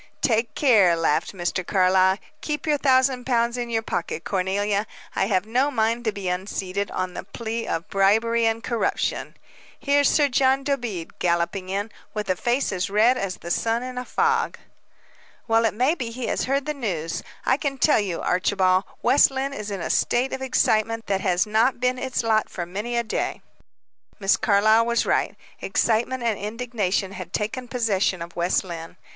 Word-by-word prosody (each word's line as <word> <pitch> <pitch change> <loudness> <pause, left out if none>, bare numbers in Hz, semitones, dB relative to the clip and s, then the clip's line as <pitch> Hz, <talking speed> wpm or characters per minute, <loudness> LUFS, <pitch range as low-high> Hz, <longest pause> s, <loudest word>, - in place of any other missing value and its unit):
"Take 230 -1 +1
care," 210 - +5
laughed 165 -1 0
Mr. 185 0 -2
Carlyle. 190 0 +3 0.2
"Keep 300 -1 -3
your 300 -2 +1
thousand 260 -2 +3
pounds 235 -1 +1
in 240 -1 -3
your 225 -1 -1
pocket, 165 -5 -3
Cornelia. 200 +2 0 0.3
I 190 - +1
have 190 -2 +1
no 250 +6 +1
mind 230 -2 0
to 220 - +2
be 200 -2 -6
unseated, 190 +1 -3
on 185 -1 -3
the - - -6
plea 225 +4 -5
of 165 +4 -3
'bribery 225 +4 +2
and 225 +1 -1
corruption.' 235 -2 -1 0.4
Here's 285 0 +3
Sir 295 -2 +3
John 270 0 +2
Dobede 240 - -3
galloping 175 +2 0
in, 200 +3 -2 0.2
with 210 -3 -1
a - - +1
face 245 +8 0
as 190 0 -2
red 220 +5 +4
as 195 -6 -3
the 170 - -7
sun 230 +5 0
in 255 0 -5
a - - -4
fog." 455 - 0 0.9
"Well, 225 0 +3
it 225 - +1
may 255 +7 +2
be 250 -9 -4
he 240 +1 -5
has - - -1
heard 275 +1 0
the 300 - -2
news. 180 - -3 0.2
I 260 - +3
can 280 -2 -3
tell 295 0 +4
you, 190 -5 -2
Archibald, 185 +1 +2 0.2
West 255 +4 +5
Lynne 270 +1 -3
is 210 -5 -5
in 200 -3 -4
a - - -2
state 250 +2 +1
of 265 - -4
excitement 225 -3 +1
that 195 -1 -1
has 180 -2 +2
not 220 +4 +2
been 250 0 0
its 255 -1 -2
lot 220 -1 +1
for 175 - -5
many 210 +7 -4
a 235 - +1
day." 220 - -3 0.8
Miss 195 -1 +3
Carlyle 215 +2 +3
was 235 0 +1
right. - - 0 0.2
Excitement 240 +3 0
and 225 -3 0
indignation 210 -3 -2
had 185 -2 -8
taken 230 +4 -3
possession 205 -7 0
of 170 0 -11
West 175 +1 +1
Lynne. 165 -3 -8
220 Hz, 185 wpm, -24 LUFS, 190-250 Hz, 0.9 s, care